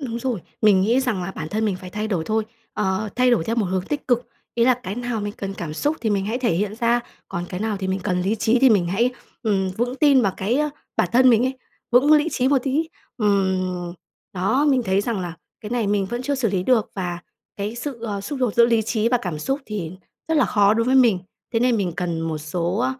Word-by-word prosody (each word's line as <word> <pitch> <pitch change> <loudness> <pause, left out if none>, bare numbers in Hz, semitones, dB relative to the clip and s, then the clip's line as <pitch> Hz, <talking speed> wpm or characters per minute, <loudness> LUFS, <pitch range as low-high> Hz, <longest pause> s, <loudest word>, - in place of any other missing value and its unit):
Đúng 235 -4 -4
rồi. 240 -5 -2 0.2
Mình 200 -3 +6
nghĩ 230 +7 +3
rằng 235 -8 -1
là 180 - -4
bản 160 -4 -6
thân 215 +4 -1
mình 205 -4 0
phải 185 0 -10
thay 215 +3 -3
đổi 175 -6 -1
thôi, 220 0 0 0.3
ờ, 210 0 -1
thay 250 0 +4
đổi 230 -9 +2
theo 230 +5 -2
một 215 - +1
hướng 185 0 -1
tích 290 +9 -4
cực. 245 -1 +2 0.3
Ý 235 - +3
là 255 0 +5
cái 190 +2 -4
nào 240 -1 -3
mình 205 0 -3
cần 195 -1 -5
cảm 160 -5 -5
xúc 295 - 0
thì 220 - 0
mình 200 -1 0
hãy 225 +4 -1
thể 245 -3 +1
hiện 205 +4 -1
ra, 235 +1 +2 0.3
còn 175 - -4
cái 180 - -5
nào 215 -1 -1
thì 190 -1 -4
mình 190 +1 -1
cần 180 0 0
lý 195 +4 +1
trí 225 +3 +2
thì 265 +1 +6
mình 195 -6 +3
hãy, 225 +8 +1 0.3
ừm, 195 -4 +1
vững 245 +3 -1
tin 280 -3 +5
vào 195 -3 +1
cái 230 +9 0 0.4
bản 180 - +2
thân 255 +1 +6
mình 230 0 +4
ấy, 260 0 -2 0.3
vững 255 +5 +5
lý 300 +1 +5
trí 255 +1 +1
một 280 0 +4
tí. 295 +4 0 0.3
Ừm. 185 -4 0 0.4
Đó, 195 +10 +1
mình 260 -2 +3
thấy 190 -1 +2
rằng 215 -1 -2
là 175 -2 -5 0.3
cái 210 - -8
này 235 -3 0
mình 200 -1 +1
vẫn 240 +4 -4
chưa 285 +2 -1
xử 260 -4 0
lý 190 -2 0
được, 235 -1 +2
và 175 -3 -3 0.4
cái 205 +3 -3
sự, 245 +1 -5
ờ, 205 -3 -3
xung 265 +8 -5
đột 250 -5 0
giữa 235 0 +6
lý 230 -2 +2
trí 220 +1 0
và 245 0 +2
cảm 175 -5 -3
xúc 270 - -2
thì 185 -6 -4 0.4
rất 320 - +1
là 280 - +5
khó 205 -1 +3
đối 230 - +1
với 255 +2 +2
mình, 235 -8 +5 0.3
thế 225 - +1
nên 245 -1 +3
mình 185 -5 -1
cần 170 -2 -2
một 165 -1 -2
số 175 +8 -1
215 Hz, 260 wpm, -22 LUFS, 190-245 Hz, 0.4 s, Mình